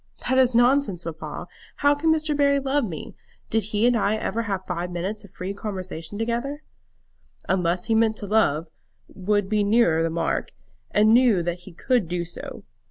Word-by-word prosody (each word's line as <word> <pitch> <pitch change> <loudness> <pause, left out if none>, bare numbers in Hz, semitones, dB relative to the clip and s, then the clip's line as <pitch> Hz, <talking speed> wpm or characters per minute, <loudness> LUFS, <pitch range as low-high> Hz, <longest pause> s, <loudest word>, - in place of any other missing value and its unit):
"That 260 +1 +3
is 255 -2 +3
nonsense, 240 -7 +3
papa. 160 -1 -6 0.3
How 285 0 +3
can 310 +3 +1
Mr. 310 -1 +1
Barry 280 -1 +3
love 275 0 0
me? 165 -7 -7 0.4
Did 220 -2 +1
he 215 +1 0
and 245 0 +4
I 215 -1 +2
ever 220 +1 -2
have 195 -4 -3
five 180 0 -3
minutes 185 +5 -4
of 200 - -13
free 185 +3 -5
conversation 190 -3 -6
together?" 240 +7 -2 0.8
"Unless 180 -1 +1
he 225 - +1
meant 220 -1 +3
to 205 - -4
love, 190 -7 +2 0.5
would 205 +1 0
be 210 0 +1
nearer 200 -6 +3
the 165 - +1
mark; 165 +1 -2 0.4
and 215 +1 +4
knew 235 -7 +5
that 175 +1 -2
he - - -13
could 230 +3 0
do 175 -1 -2
so. 170 - -8
210 Hz, 180 wpm, -24 LUFS, 180-240 Hz, 0.8 s, knew